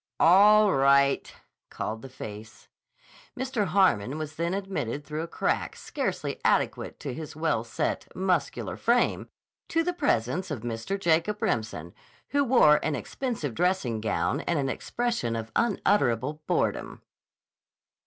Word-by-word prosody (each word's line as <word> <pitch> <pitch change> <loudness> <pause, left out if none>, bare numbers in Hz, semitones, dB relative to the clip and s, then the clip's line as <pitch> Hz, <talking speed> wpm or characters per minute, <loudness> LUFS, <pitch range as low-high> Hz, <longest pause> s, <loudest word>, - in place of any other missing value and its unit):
"All 205 +4 +6
right," 140 0 +3 0.4
called 110 +1 -4
the 135 - -9
face. 110 -4 -10 0.7
Mr. 255 -6 -1
Harmon 155 - +2
was 155 -1 -5
then 170 +3 -1
admitted 185 - -3
through 155 +1 -4
a 165 - -4
crack - - -1
scarcely - - -4
adequate - - 0
to 135 - -4
his 155 +1 -7
well 155 -7 0
set, 120 - -2
muscular 180 -6 -1
frame, 240 +1 +1 0.4
to 330 0 +1
the 355 +1 -1
presence 185 - 0
of 145 -8 -4
Mr. 120 - -3
Jacob 175 +3 +1
Remsen, 110 -7 -2 0.4
who 285 0 +2
wore 235 - +6
an 155 - 0
expensive 210 - -4
dressing 140 -8 0
gown 135 +6 0
and 170 - +1
an 135 -2 0
expression 230 - -2
of 110 0 -5
unutterable 150 - +1
boredom. - - -1
155 Hz, 135 wpm, -27 LUFS, 125-195 Hz, 0.7 s, All